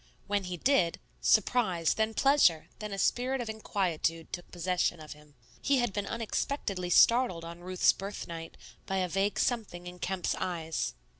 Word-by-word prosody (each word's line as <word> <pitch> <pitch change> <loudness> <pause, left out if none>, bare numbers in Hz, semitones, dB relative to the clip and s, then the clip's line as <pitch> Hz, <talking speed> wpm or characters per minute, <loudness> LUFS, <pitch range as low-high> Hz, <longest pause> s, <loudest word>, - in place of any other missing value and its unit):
When 200 -1 -1
he 180 0 -4
did, 250 - +2 0.2
surprise, 190 -7 +3
then 220 0 -1
pleasure, 270 - +4
then 210 -1 -5
a 195 - -4
spirit 255 +6 +1
of 230 -3 -3
inquietude, 175 -6 -2
took 175 - -6
possession 175 -1 0
of 155 -1 -9
him. 150 -1 -20 0.3
He 275 - +2
had 240 -5 0
been 205 0 -2
unexpectedly 215 -5 -2
startled 210 -4 +4
on 170 +1 -8
Ruth's 185 +1 +3
birthnight 170 -4 -7 0.3
by 195 - -1
a 185 -1 +1
vague 195 +3 0
something 210 -8 -1
in 180 0 -9
Kemp's 185 0 -1
eyes. 165 - -3
185 Hz, 160 wpm, -30 LUFS, 170-220 Hz, 0.3 s, pleasure